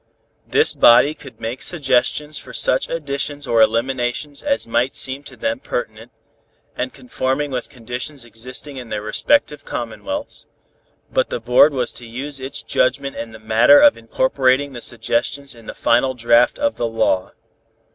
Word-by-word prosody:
This -, -, +4 dB
body 125 Hz, +5 st, +6 dB
could 140 Hz, -3 st, -14 dB
make 115 Hz, +3 st, -5 dB
suggestions 150 Hz, -1 st, 0 dB
for -, -, -12 dB
such 130 Hz, -, +3 dB
additions 145 Hz, -2 st, -3 dB
or 115 Hz, -1 st, +2 dB
eliminations 120 Hz, +5 st, 0 dB
as 280 Hz, -1 st, 0 dB
might 120 Hz, +3 st, 0 dB
seem 130 Hz, +1 st, +3 dB
to -, -, -9 dB
them 280 Hz, 0 st, -2 dB
pertinent, -, -, -5 dB, 0.6 s
and -, -, -3 dB
conforming 145 Hz, -, -3 dB
with 125 Hz, -2 st, -4 dB
conditions 125 Hz, +2 st, -6 dB
existing 125 Hz, +5 st, -7 dB
in 125 Hz, -3 st, -8 dB
their 105 Hz, -1 st, -4 dB
respective 150 Hz, -, +1 dB
commonwealths, 285 Hz, -, -6 dB, 0.7 s
but -, -, +1 dB
the -, -, -3 dB
board 125 Hz, +5 st, +5 dB
was 130 Hz, -3 st, -2 dB
to 120 Hz, -, -10 dB
use 135 Hz, +4 st, -5 dB
its 135 Hz, +2 st, -4 dB
judgment 140 Hz, +2 st, 0 dB
in 115 Hz, -, -6 dB
the 110 Hz, -, -11 dB
matter 110 Hz, -, +5 dB
of 290 Hz, 0 st, +6 dB
incorporating 130 Hz, +4 st, 0 dB
the 120 Hz, -, -8 dB
suggestions 120 Hz, +5 st, -2 dB
in 115 Hz, -2 st, -16 dB
the -, -, -7 dB
final 130 Hz, +2 st, +2 dB
draft 120 Hz, 0 st, +3 dB
of 285 Hz, 0 st, -1 dB
the 120 Hz, -, -1 dB
law. 110 Hz, -5 st, 0 dB
130 Hz, 155 wpm, -19 LUFS, 120-145 Hz, 0.7 s, body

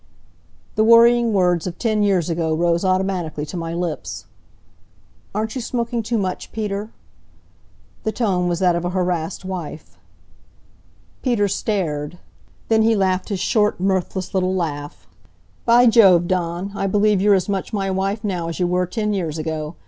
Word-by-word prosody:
The 215 Hz, -, +4 dB
worrying 235 Hz, +1 st, +6 dB
words 180 Hz, -4 st, +2 dB
of 175 Hz, -, -6 dB
ten 215 Hz, -3 st, 0 dB
years 195 Hz, -5 st, +2 dB
ago 165 Hz, -2 st, -1 dB
rose 170 Hz, +1 st, +1 dB
automatically 185 Hz, -5 st, -1 dB
to 155 Hz, -, -8 dB
my 165 Hz, -1 st, -4 dB
lips. 175 Hz, -2 st, -4 dB, 1.1 s
"Aren't 220 Hz, +1 st, -2 dB
you 260 Hz, -, -4 dB
smoking 235 Hz, 0 st, -2 dB
too 230 Hz, +1 st, -2 dB
much, 185 Hz, -3 st, -3 dB
Peter?" 210 Hz, -1 st, -3 dB, 1.1 s
The 220 Hz, -, 0 dB
tone 190 Hz, -7 st, 0 dB
was 175 Hz, -1 st, 0 dB
that 180 Hz, -1 st, +2 dB
of 170 Hz, -, -2 dB
a 175 Hz, -, -1 dB
harassed 180 Hz, 0 st, -2 dB
wife. 175 Hz, -5 st, -7 dB, 1.2 s
Peter 235 Hz, -6 st, +1 dB
stared. 175 Hz, -6 st, -2 dB, 0.5 s
Then 220 Hz, -1 st, +3 dB
he 225 Hz, +1 st, +3 dB
laughed 190 Hz, -1 st, 0 dB
his 200 Hz, -3 st, -2 dB
short, 210 Hz, +1 st, +1 dB
mirthless 190 Hz, 0 st, -1 dB
little 185 Hz, -1 st, +1 dB
laugh. 145 Hz, -5 st, -4 dB, 0.6 s
"By 240 Hz, +1 st, +6 dB
Jove! 195 Hz, -7 st, +6 dB
Dawn, 180 Hz, +1 st, -2 dB
I 195 Hz, -, -2 dB
believe 205 Hz, 0 st, +2 dB
you're 205 Hz, 0 st, +5 dB
as 185 Hz, -, 0 dB
much 195 Hz, 0 st, -2 dB
my 195 Hz, -3 st, -1 dB
wife 195 Hz, +3 st, -2 dB
now 180 Hz, -5 st, -2 dB
as 165 Hz, +1 st, -5 dB
you 180 Hz, -, +2 dB
were 180 Hz, +1 st, 0 dB
ten 210 Hz, +2 st, -2 dB
years 165 Hz, -5 st, -2 dB
ago. 155 Hz, 0 st, -4 dB
190 Hz, 160 wpm, -21 LUFS, 175-210 Hz, 1.2 s, worrying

